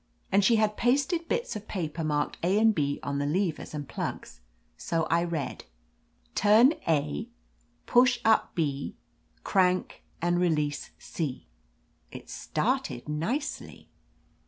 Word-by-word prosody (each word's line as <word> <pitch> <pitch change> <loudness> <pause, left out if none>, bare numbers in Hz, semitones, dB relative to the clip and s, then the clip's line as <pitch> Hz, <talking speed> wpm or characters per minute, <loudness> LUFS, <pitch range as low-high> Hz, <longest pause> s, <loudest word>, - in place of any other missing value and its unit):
And 200 +1 +4
she 230 +4 +5
had 215 -1 +1
pasted 285 +8 +1
bits 475 - -1
of 210 0 -7
paper 165 -4 -3
marked 150 -1 -1
A 185 +4 +2
and 220 0 +5
B 145 -5 -1
on 140 0 -2
the 145 - -1
levers 170 0 -1
and 145 -2 -5
plugs. - - -5 0.4
So 165 - -1
I 170 +1 +3
read: 160 -7 -4 0.7
"Turn 220 +8 +6
A; 140 - 0 0.6
push 245 0 +4
up 220 0 +3
B; 145 -4 -2 0.5
crank, 185 -1 +1 0.2
and 175 +1 +1
release 150 -5 0
C." 150 -6 -5 0.7
It - - -10
started 120 - -2
nicely. 225 - -3
175 Hz, 130 wpm, -28 LUFS, 150-215 Hz, 0.7 s, Turn